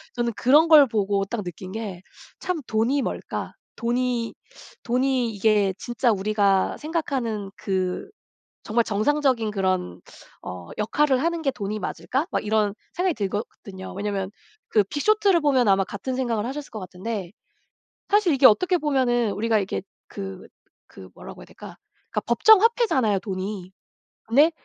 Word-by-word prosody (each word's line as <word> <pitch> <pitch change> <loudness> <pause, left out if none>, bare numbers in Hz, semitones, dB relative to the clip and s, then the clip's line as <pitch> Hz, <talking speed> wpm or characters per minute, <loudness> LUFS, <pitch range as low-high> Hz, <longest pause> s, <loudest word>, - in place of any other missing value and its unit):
저는 235 -1 -1
그런 295 +6 +5
걸 300 -3 +9
보고 200 -3 0
딱 215 0 -4
느낀 185 +2 -8
게 205 -5 -6 0.4
참 365 -3 -2
'돈이 235 +6 +1
뭘까? - - -4 0.2
돈이 240 0 -1 0.5
돈이 250 -1 +1
이게 205 -1 +2
진짜 240 0 0
우리가 200 -1 +1
생각하는 260 - -3
그 185 - -2 0.6
정말 230 +1 +1
정상적인 235 +1 +1
그런 185 - -1 0.4
어 90 -1 -8
역할을 260 +5 +2
하는 335 -1 -1
게 275 - +2
돈이 210 -2 -4
맞을까?' 270 +8 -2
막 - - -2
이런 210 -1 +1 0.2
생각이 360 -1 0
들거든요. 200 -2 -5
왜냐하면 200 -1 -3 0.4
그 210 -3 +3
빅쇼트를 390 - +2
보면 260 -6 +3
아마 195 0 +4
같은 210 +7 -5
생각을 235 -4 -1
하셨을 285 +2 -6
것 220 - -7
같은데 185 0 -5 0.8
사실 405 -6 +3
이게 265 0 +3
어떻게 360 - +3
보면은 250 -7 +1
우리가 220 +2 +1
이렇게 195 -1 -3 0.3
그 195 -2 -8 0.4
그 - - -12
뭐라고 - - -11
해야 - - -11
될까 - - -12 0.3
그러니까 - - -1
법정화폐잖아요 435 - +4
돈이. 190 -1 -5 0.5
근데 290 +9 +4
225 Hz, 310 characters per minute, -24 LUFS, 200-275 Hz, 0.8 s, 걸